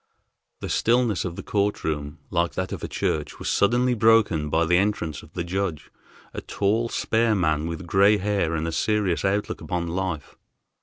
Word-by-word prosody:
The -, -, -4 dB
stillness 115 Hz, -4 st, +2 dB
of 85 Hz, -2 st, -4 dB
the -, -, -7 dB
court 100 Hz, 0 st, -1 dB
room, 75 Hz, -2 st, -3 dB
like 85 Hz, -1 st, 0 dB
that 95 Hz, 0 st, -3 dB
of -, -, -6 dB
a -, -, -2 dB
church, -, -, -2 dB
was -, -, -3 dB
suddenly 120 Hz, +5 st, +3 dB
broken 110 Hz, -9 st, +3 dB
by 80 Hz, +2 st, +2 dB
the 90 Hz, +2 st, +3 dB
entrance 95 Hz, -7 st, -1 dB
of 80 Hz, -, -17 dB
the 85 Hz, -, -3 dB
judge, 90 Hz, -3 st, -3 dB, 0.4 s
a -, -, -5 dB
tall, 110 Hz, +4 st, 0 dB
spare 115 Hz, -1 st, +1 dB
man, 80 Hz, -4 st, +1 dB
with 85 Hz, +2 st, -5 dB
gray 100 Hz, +4 st, +4 dB
hair 100 Hz, -5 st, 0 dB
and 80 Hz, +1 st, -2 dB
a -, -, -2 dB
serious 105 Hz, -1 st, 0 dB
outlook 100 Hz, +1 st, -1 dB
upon 90 Hz, -2 st, -2 dB
life. 85 Hz, -4 st, -3 dB
95 Hz, 185 wpm, -24 LUFS, 85-105 Hz, 0.4 s, gray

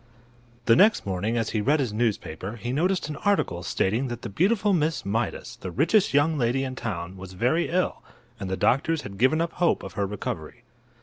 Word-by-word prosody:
The 115 Hz, -, +6 dB
next 210 Hz, -, +5 dB
morning, 100 Hz, +5 st, -1 dB
as 115 Hz, -1 st, -1 dB
he 110 Hz, -, 0 dB
read 145 Hz, +7 st, +2 dB
his 125 Hz, -6 st, -1 dB
newspaper, 105 Hz, -4 st, -2 dB
he 120 Hz, +1 st, -4 dB
noticed 175 Hz, +5 st, +1 dB
an 150 Hz, -2 st, -5 dB
article 200 Hz, -, 0 dB
stating 110 Hz, +8 st, 0 dB
that 120 Hz, -1 st, -6 dB
the -, -, -4 dB
beautiful 200 Hz, -, +2 dB
Miss 160 Hz, -2 st, 0 dB
Mydas, 110 Hz, +4 st, -2 dB
the -, -, -6 dB
richest 165 Hz, -, +2 dB
young 145 Hz, +2 st, +2 dB
lady 125 Hz, +2 st, +1 dB
in 130 Hz, -1 st, -4 dB
town, 95 Hz, -7 st, -5 dB
was 95 Hz, 0 st, -9 dB
very 125 Hz, -, +1 dB
ill, 180 Hz, +1 st, 0 dB, 0.4 s
and 95 Hz, -, -4 dB
the 95 Hz, -, -2 dB
doctors 155 Hz, +4 st, +2 dB
had 100 Hz, -1 st, -9 dB
given 130 Hz, +7 st, +3 dB
up 170 Hz, -, -1 dB
hope 175 Hz, -1 st, +1 dB
of 95 Hz, -, -7 dB
her 100 Hz, -1 st, -1 dB
recovery. 105 Hz, 0 st, -6 dB
120 Hz, 200 wpm, -26 LUFS, 100-160 Hz, 0.4 s, The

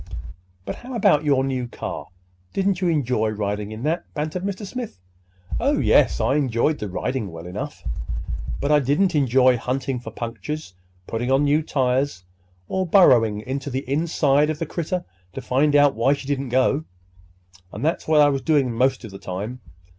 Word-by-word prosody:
"But -, -, -5 dB
how 250 Hz, +1 st, -8 dB
about 150 Hz, -9 st, +4 dB
your 140 Hz, -3 st, +3 dB
new 130 Hz, -2 st, -2 dB
car? -, -, -6 dB, 0.5 s
Didn't 195 Hz, -1 st, 0 dB
you 180 Hz, -, +2 dB
enjoy 125 Hz, -9 st, +1 dB
riding 105 Hz, 0 st, -3 dB
in 110 Hz, +2 st, -7 dB
that?" 165 Hz, +4 st, 0 dB
bantered 155 Hz, +4 st, -3 dB
Mr. 200 Hz, +1 st, -3 dB
Smith. 235 Hz, -, -6 dB, 0.6 s
"Oh, -, -, +2 dB
yes, -, -, +4 dB
I 135 Hz, -, +2 dB
enjoyed 140 Hz, +2 st, +1 dB
the 105 Hz, -, -4 dB
riding 110 Hz, +1 st, -3 dB
well 80 Hz, +1 st, -9 dB
enough; 95 Hz, +1 st, -6 dB, 0.8 s
but 140 Hz, -, 0 dB
I 150 Hz, -, +6 dB
didn't 145 Hz, +8 st, +2 dB
enjoy 130 Hz, -3 st, +4 dB
hunting 130 Hz, +2 st, -2 dB
for 120 Hz, -, -8 dB
punctures, 115 Hz, +2 st, -6 dB, 0.3 s
putting 120 Hz, +5 st, -2 dB
on 135 Hz, +2 st, +4 dB
new 145 Hz, +2 st, +3 dB
tires, 130 Hz, -, 0 dB, 0.4 s
or 190 Hz, -1 st, -1 dB
burrowing 120 Hz, -, +5 dB
into 135 Hz, +4 st, -4 dB
the 130 Hz, 0 st, -4 dB
inside 145 Hz, 0 st, +2 dB
of 155 Hz, -, -2 dB
the 165 Hz, -, -3 dB
critter 175 Hz, +3 st, -3 dB, 0.3 s
to -, -, -5 dB
find 145 Hz, +3 st, +2 dB
out 145 Hz, -1 st, +6 dB
why 120 Hz, +5 st, +2 dB
she 140 Hz, -, -6 dB
didn't 140 Hz, -2 st, -2 dB
go! 130 Hz, +4 st, +2 dB, 0.9 s
And -, -, -4 dB
that's 160 Hz, -, -1 dB
what 155 Hz, -1 st, +5 dB
I 145 Hz, -, +6 dB
was 135 Hz, -1 st, -1 dB
doing 145 Hz, -5 st, +2 dB
most 130 Hz, +2 st, +1 dB
of 110 Hz, -, -9 dB
the 95 Hz, -, -9 dB
time. 100 Hz, +7 st, -5 dB
135 Hz, 175 wpm, -23 LUFS, 120-150 Hz, 0.9 s, I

